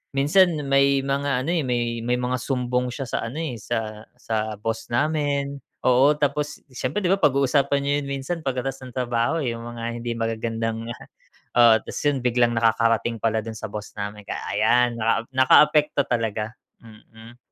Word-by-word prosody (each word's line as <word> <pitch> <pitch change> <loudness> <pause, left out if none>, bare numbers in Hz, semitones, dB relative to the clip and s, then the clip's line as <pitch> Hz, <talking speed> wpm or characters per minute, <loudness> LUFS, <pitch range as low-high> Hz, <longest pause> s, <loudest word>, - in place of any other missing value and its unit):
minsan 165 +7 +4 0.2
may 140 0 +4
mga 140 -1 0
ano 170 - 0
eh, 170 - +1
may 120 -1 -1
may 125 +1 +1
mga 125 0 -1
sumbong 125 -1 -1
siya 135 +3 -5
sa - - -2
ano 135 +7 -7
eh, 135 -6 -3
sa 110 -1 -4
sa 110 -2 -2
boss 115 +1 -3
namin 140 +1 0 0.3
oo 130 +4 +5
tapos 145 0 -1 0.2
siyempre 140 +11 -2
di 175 - +3
ba 195 - +3
pag 145 -3 +4
uusapan 140 +1 +2
niyo 140 - 0
yun 140 - -7
minsan 165 +6 -4
pag-katas 135 -1 -3
ng 125 -1 -11
trabaho 120 +4 0
eh, 120 - -1
yung 115 0 -7
mga 120 -1 -7 0.2
hindi 120 0 -3
magagandang 115 0 -2 0.7
oo 120 -2 +8
tas - - -6
yun 140 -3 +1
biglang 120 -1 +2
nakakarating 115 0 +2
pala 110 0 0
dun 110 0 -7
sa - - -6
boss 105 -1 -6
namin 105 0 -5
kaya - - -5
ayan, 120 -1 +3
naka 115 0 +1 0.2
naka-apekto 145 +2 +4
talaga, 110 -2 -2 0.3
mm. 110 +2 -15
125 Hz, 175 wpm, -23 LUFS, 115-140 Hz, 0.7 s, oo